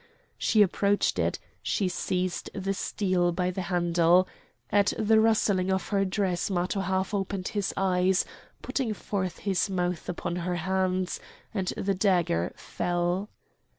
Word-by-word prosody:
She 215 -2 +5
approached 200 +1 +1
it; - - +1 0.2
she 200 - 0
seized 180 0 -2
the 195 0 -1
steel 185 -3 0
by 180 +1 0
the 190 - -3
handle. 175 0 +3 0.4
At 205 0 +3
the 220 0 +4
rustling 210 -4 +3
of 190 -1 -1
her 195 -1 +2
dress 185 -2 0
Matho 185 +1 0
half 190 +1 -1
opened 195 -1 -2
his 205 -2 -1
eyes, 185 0 +2 0.4
putting 235 -6 -1
forth 190 -4 -3
his 195 -1 +1
mouth 180 -2 -2
upon 175 0 -3
her 180 0 -2
hands, 185 +1 0 0.3
and 190 -4 -2
the 195 0 0
dagger 180 - +1
fell. 175 +3 -1
185 Hz, 140 wpm, -28 LUFS, 180-200 Hz, 0.4 s, She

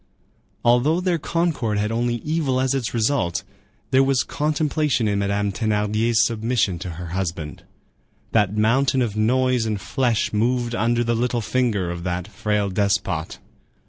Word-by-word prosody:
Although 125 +8 +4
their 180 -2 0
concord 155 -10 -1
had 105 +1 0
only 120 +1 0
evil 150 -5 0
as 130 0 +1
its 130 -5 -2
result, 110 -6 0 0.5
there 130 0 +5
was 135 -3 +2
contemplation 150 -4 0
in 100 -1 0
Madame 100 0 0
Thénardier's 110 +2 +1
submission 115 -5 0
to 90 - -5
her 85 -1 -6
husband. 85 -5 -4 0.7
That 105 -2 +2
mountain 130 +4 +3
of 110 -4 -3
noise 125 +2 +2
and 110 - 0
of 100 - -7
flesh 120 -6 0
moved 120 +2 0
under 120 +1 +1
the 120 0 0
little 120 +1 0
finger 110 -7 0
of 85 0 -6
that 90 0 -3
frail 105 0 -1
despot. 95 -4 -1
115 Hz, 150 wpm, -22 LUFS, 100-130 Hz, 0.7 s, there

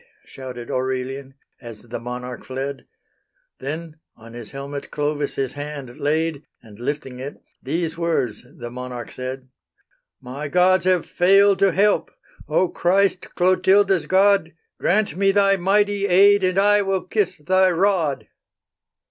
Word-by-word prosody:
Shouted 125 -3 -8
Aurelian, 130 +1 -3 0.3
as 115 -3 -10
the 120 0 -6
monarch 125 +1 -7
fled; 135 +1 -5 0.7
Then, 155 +3 -6 0.2
on 115 0 -14
his 120 -3 -9
helmet, 140 +1 -7
Clovis 145 -1 -2
his 135 -2 -2
hand 145 -4 -7
laid, 155 0 0 0.2
And 110 -2 -16
lifting 130 0 -4
it, 140 +3 -7 0.2
these 165 +4 -2
words 165 -11 -1
the 120 0 -7
monarch 125 -1 -7
said: 130 0 -6 0.7
"My 135 +4 -6
gods 180 +3 +3
have 185 -2 +2
failed 195 +2 +4
to 195 -1 +4
help: 200 +4 +2 0.4
O 185 - +2
Christ, 185 +2 0
Clotilda's 190 +1 +3
God, 195 -3 +3 0.3
Grant 200 -3 +1
me 195 +1 +2
Thy 195 0 +3
mighty 200 +2 +1
aid, 200 +2 +5
and 185 0 +1
I 205 +1 +4
will 195 -2 -1
kiss 185 -1 -1
Thy 185 +4 +3
rod." 175 -5 0
160 Hz, 135 wpm, -22 LUFS, 130-190 Hz, 0.7 s, aid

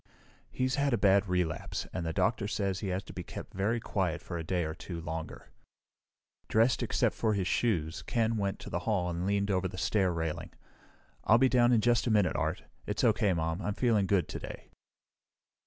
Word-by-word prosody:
"He's 130 +1 -1
had 140 -2 +2
a - - +3
bad 100 0 +4
relapse, 90 -4 -1
and 95 - -3
the 80 - -2
doctor 100 +4 +1
says 100 -3 -1
he 105 - -4
has 95 +1 -2
to - - -11
be - - -5
kept - - -9
very 105 +5 0
quiet 95 -6 -1
for - - -7
a - - -4
day 90 +1 0
or 80 - -3
two 85 +1 -7
longer." 80 0 -6 1.0
Dressed, 115 +3 +3
except - - +1
for 110 -2 0
his 95 -2 -1
shoes, 85 -10 0
Ken 115 -1 0
went 100 -2 -1
to - - -8
the 85 - -1
hall 90 -5 +1
and 85 +2 -2
leaned 100 0 +1
over 95 -1 +1
the 90 - -8
stair 95 -1 +1
railing. 80 -2 -3 0.7
"I'll 110 - +6
be 130 +1 +4
down 120 -1 +4
in 115 -3 +4
just 120 +1 +2
a - - +2
minute, 105 -4 +3
Art. - - -1 0.2
It's - - -1
okay, 100 - +3
Mom. 80 +1 -1
I'm 105 -1 -2
feeling 110 -6 +2
good 90 -5 +2
today." - - -8
100 Hz, 205 wpm, -30 LUFS, 85-110 Hz, 1.0 s, I'll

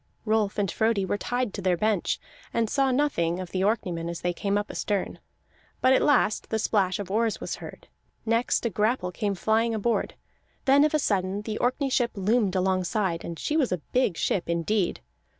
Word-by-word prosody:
Rolf 215 -2 +1
and 200 -4 0
Frodi 220 -3 +1
were 205 - -2
tied 245 -3 -2
to 200 - -5
their 180 -2 +2
bench, 210 -1 0 0.4
and 230 -1 +2
saw 270 -1 +2
nothing 250 - +1
of 185 -2 -6
the 185 - -1
Orkneymen 180 -6 -1
as 170 - -5
they 175 0 0
came 200 +3 -1
up 205 0 -3
astern. 205 -2 -2 0.6
But 260 +1 +4
at - - +4
last 270 -7 +2
the 220 - 0
splash 195 -4 +1
of 195 -2 -6
oars 225 +1 +1
was - - -4
heard; - - -10 0.4
next 230 +2 +1
a 235 - 0
grapple 210 -2 0
came 205 +1 -2
flying 225 +4 +1
aboard; 225 +2 -1 0.5
then 280 +1 +6
of 305 0 +2
a - - +5
sudden 200 -6 0
the 215 0 -4
Orkney 260 +3 0
ship 245 -2 +2
loomed 205 0 +1
alongside, 185 -1 0
and 170 - -6
she 300 - -2
was 285 -9 +2
a 180 - +1 0.2
big 250 -9 +2
ship 175 -3 -1
indeed. 170 - 0
210 Hz, 195 wpm, -26 LUFS, 185-235 Hz, 0.6 s, then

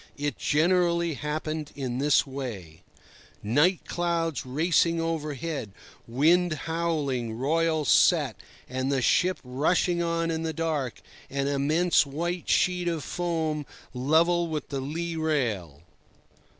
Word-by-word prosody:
It 145 0 -2
generally 170 +1 +2
happened 155 +1 -4
in 130 -3 -3
this 145 0 +3
way: 115 - -7 0.6
Night, 150 - +3
clouds 170 -5 -1
racing 165 +4 +2
overhead, 155 -7 -3 0.3
wind 160 +8 +3
howling, 150 -8 -1
royals 155 +4 0
set, - - +4 0.3
and 130 +1 -2
the 135 -3 +1
ship 180 +9 +3
rushing 160 +7 +1
on 165 0 0
in 160 0 -2
the 160 -1 -2
dark, 155 -7 -2 0.3
an 140 0 -1
immense 150 +5 +3
white 170 +5 -4
sheet 180 -1 +2
of 165 -4 -1
foam 160 -3 -2 0.3
level 165 +7 +2
with 155 -3 -4
the 140 -2 -3
lee 165 +5 -3
rail. 115 - -1
155 Hz, 120 wpm, -27 LUFS, 135-170 Hz, 0.6 s, set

